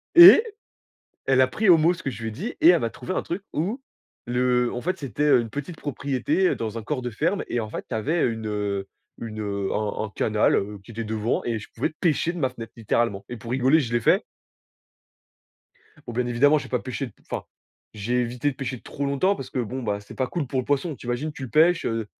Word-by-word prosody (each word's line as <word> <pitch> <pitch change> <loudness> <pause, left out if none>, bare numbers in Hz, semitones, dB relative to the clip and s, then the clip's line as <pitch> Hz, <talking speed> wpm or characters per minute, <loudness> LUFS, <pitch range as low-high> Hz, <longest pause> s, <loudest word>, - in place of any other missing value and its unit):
Et 345 +5 +11 0.8
elle 135 -1 +4
a 130 - +6
pris 215 +11 -1
au 175 - +9
mot 165 +3 +4
ce 180 - -11
que 135 - -2
je 115 -1 -8
lui 110 - -2
ai - - -8
dit 200 - -5
et - - +8
elle 175 -2 +6
m'a 115 - 0
trouvé 185 - -6
un - - 0
truc 175 +4 -4
où, 205 - -2 0.4
le 125 0 +1
en 120 - -3
fait, 185 +7 -2
c'était, 140 +1 -2
heu, 145 -4 +5
une 115 -1 -5
petite 145 +6 -6
propriété, 145 - 0
dans 115 0 -4
un - - -6
corps 130 +4 -3
de 125 - -3
ferme 165 - -1
et 120 - -1
en 110 - -4
fait, - - -5
tu - - -4
avais 150 +10 +1
une, 115 -2 -3
heu, 100 -2 -2 0.3
une 110 -2 -6 0.3
un 105 0 -2
un 110 - -5
canal, 105 -1 +2
heu, 105 +1 -2
qui 115 - -12
était 115 +1 -4
devant 110 +1 -1
et 115 -2 -1
je 105 - -11
pouvais 115 - -1
pêcher 170 0 +1
de 175 - -7
ma 135 -5 +1
fenêtre, 115 -3 -9
littéralement 110 -2 0
et 120 - -6
pour 115 +1 -9
rigoler, 130 +4 +4
je 120 -5 -4
l'ai 120 - +2
fait - - +3 1.8
bon, 120 - -6
bien 125 +1 -1
évidemment, 140 +5 +4
j'ai - - -8
pas 125 - 0
pêché 135 +1 -4
d 120 - -12 0.2
enfin - - -3 0.5
j'ai 120 +4 0
évité 120 +4 -1
de 130 - -10
pêcher 130 -2 -4
trop 140 - -5
longtemps, 140 +9 +1
parce 135 - -8
que - - -3
bon, 125 +2 -3
bah 105 -3 -2
c'est 100 - -12
pas 130 - -1
cool 160 +1 -3
pour 130 0 -1
le - - -7
poisson. 145 +3 -1
Tu - - -12
imagines, 120 +6 -2
tu 140 - -9
le 130 - -6
pêches, 170 +3 +4
heu, 115 -1 -1
125 Hz, 245 wpm, -25 LUFS, 115-150 Hz, 1.8 s, Et